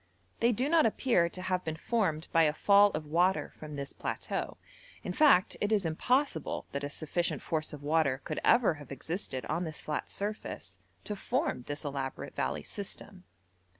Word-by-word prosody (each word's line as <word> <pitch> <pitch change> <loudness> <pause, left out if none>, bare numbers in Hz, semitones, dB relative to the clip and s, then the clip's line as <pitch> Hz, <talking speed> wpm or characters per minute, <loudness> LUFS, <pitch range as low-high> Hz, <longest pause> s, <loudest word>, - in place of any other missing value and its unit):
They 235 +1 +4
do 250 +4 0
not 320 -4 +5
appear 215 -7 +2
to 185 - -6
have 185 -1 0
been 160 -1 -3
formed 165 -4 0
by 165 - +6
a 150 -2 +4
fall 200 +5 +6
of 155 0 -3
water 175 +5 +2
from 155 -1 -7
this 140 -1 -5
plateau; - - -3 0.5
in - - -3
fact, 280 -12 +5
it 205 - +1
is 205 -4 +2
impossible 240 - 0
that 140 0 -3
a 145 - -2
sufficient 170 +3 -2
force 155 -1 -1
of 145 -2 -9
water 145 -3 +2
could - - -3
ever 235 -7 +5
have 145 - -12
existed 135 -1 -4
on 165 +4 -1
this 155 -3 -5
flat 150 - -3
surface 210 +2 -5 0.2
to 210 - -4
form 255 - -1
this 145 +2 -4
elaborate 135 -2 -4
valley - - -1
system. 90 - -6
165 Hz, 180 wpm, -31 LUFS, 150-210 Hz, 0.5 s, by